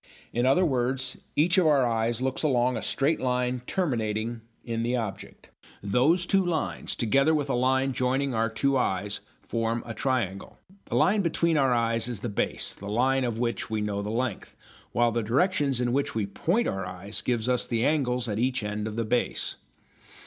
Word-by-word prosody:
In 120 +2 +1
other 160 +8 +4
words, 130 -2 -1 0.2
each 175 +5 +4
of 175 - +3
our 140 -4 +4
eyes 115 +1 0
looks 130 0 -1
along 125 -4 +2
a 115 - -3
straight 145 +4 +1
line 125 -1 0
terminating 115 - -1 0.2
in 115 -1 -2
the 120 +2 0
object. 105 -5 -6 0.3
Those 135 - +3
two 195 +1 +3
lines, 170 -4 -2
together 135 +7 +3
with 145 -2 -1
a - - +1
line 130 +2 +2
joining 130 +2 0
our 115 0 +1
two 135 +5 +1
eyes, 100 -2 -1 0.2
form 115 0 -1
a 115 - -5
triangle. 110 -6 -2 0.3
The - - -4
line 200 +2 +4
between 170 -1 +1
our 135 -3 +3
eyes 115 -1 +1
is 115 -5 -4
the 120 - -3
"base," 100 - -1
the 100 - -8
line 130 +5 +2
of 120 -3 -2
which 120 0 -2
we 110 -1 -1
know 105 -1 -2
the 105 - -4
length, 120 -1 -3 0.4
while 120 0 +2
the 115 +1 0
directions 135 - +1
in 120 -1 0
which 140 -3 0
we 110 -2 0
point 175 - 0
our 95 0 -2
eyes 90 +3 -4
give 120 -2 -1
us 125 -1 +1
the 115 -1 0
angles 125 -5 +1
at 105 -1 -2
each 125 -1 0
end 105 +1 -3
of 110 - -5
the 115 0 -1
base. 120 +3 -1
125 Hz, 190 wpm, -27 LUFS, 115-135 Hz, 0.4 s, other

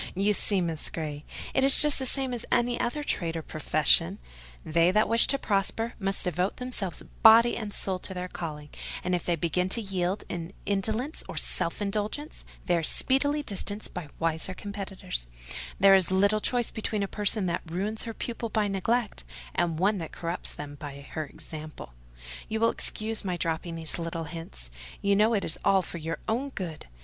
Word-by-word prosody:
You 200 +3 +3
see, 200 -1 +3
Miss 165 -3 -2
Grey, 150 -2 -5 0.3
it 265 - +3
is 270 0 +6
just 300 -2 +4
the 265 - +1
same 265 -1 0
as 240 - -4
any 240 0 +2
other 295 +5 -1
trade 165 - -1
or 160 - -4
profession: 155 +4 +2 0.5
they 165 +2 +4
that 210 +3 +3
wish 230 +2 +7
to 275 - +3
prosper 225 +1 0
must 195 -1 +1
devote 180 +1 0
themselves 245 -8 -1 0.2
body 230 +1 +8
and 215 -2 -4
soul 190 -2 -2
to 190 - -5
their 180 0 -3
calling; 150 -4 -6 0.3
and 180 - -1
if 175 - 0
they 175 - +1
begin 175 +3 0
to 230 - -1
yield 190 -2 -1
to 170 -1 -4 0.2
indolence 220 - -1
or - - -6
self 170 +5 -1
indulgence 210 +9 -3 0.2
they 175 - +3
are - - +1
speedily 285 - +2
distanced 205 -1 -1
by 180 -4 -5
wiser 165 +3 0
competitors: 195 - -4 0.5
there 195 0 +8
is 190 -2 +5
little 200 +3 +3
to - - +1
choose 245 -2 +1
between 215 -2 0
a - - -1
person 205 0 +3
that 175 -1 -1
ruins 200 +6 -2
her 230 - -4
pupils 230 -1 -4
by 215 -2 +2
neglect, 210 - 0 0.3
and 165 -2 0
one 195 +3 +2
that 165 - -5
corrupts 170 +1 -3
them 145 0 -7
by 140 -2 -7
her 155 -2 -3
example. 155 - -9 0.6
You 220 - -1
will 230 0 +4
excuse 220 +1 0
my 180 -3 -2
dropping 165 0 -2
these 165 +1 -1
little 165 0 -3
hints: 150 - -8 0.3
you 200 0 +4
know 215 +3 +4
it 200 - 0
is 160 +2 -4
all 195 -1 +4
for 170 - -6
your 165 +1 -3
own 250 +6 0
good. 175 - -6
195 Hz, 190 wpm, -28 LUFS, 165-220 Hz, 0.6 s, body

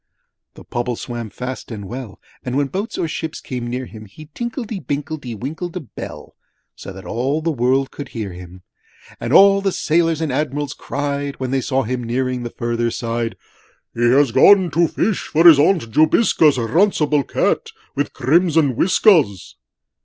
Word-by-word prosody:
III - - -54
The - - -12
Pobble 120 0 -3
swam 120 -1 -6
fast 125 +6 -7
and 105 -4 -7
well 120 -4 -8 0.2
And 125 +1 -2
when 140 -1 0
boats 200 +7 -4
or - - -1
ships 160 0 -5
came 125 -2 -5
near 125 +2 -3
him 110 -2 -11
He 155 +10 -14
tinkedly 235 - -4
binkledy 140 -2 -4
winkled 160 - -5
a - - -2
bell 145 - -10 0.4
So - - -9
that 95 0 -11
all 130 +6 -1
the 165 +1 -1
world 135 0 +1
could 140 -2 -8
hear 110 -5 -5
him. 90 +1 -12 0.6
And - - -4
all 200 0 +6
the 195 -1 0
Sailors 165 -1 +1
and 160 -4 -2
Admirals 145 0 -2
cried, 140 0 -3
When 130 -1 -3
they 135 0 +1
saw 135 +1 0
him 125 +1 -3
nearing 125 +1 -2
the 120 - -5
further 120 0 -2
side, 115 0 -3 0.6
'He 120 - -5
has 130 +2 +4
gone 180 - +6
to 170 +1 +3
fish, 210 +3 -1
for 165 +3 +4
his 155 -4 +9
Aunt 155 -6 +2
Jobiska's 155 - +4
'Runcible 150 - +2
Cat - - 0 0.3
with 145 0 -1
crimson 155 0 +2
whiskers!' 155 - +3
135 Hz, 175 wpm, -19 LUFS, 120-160 Hz, 0.6 s, his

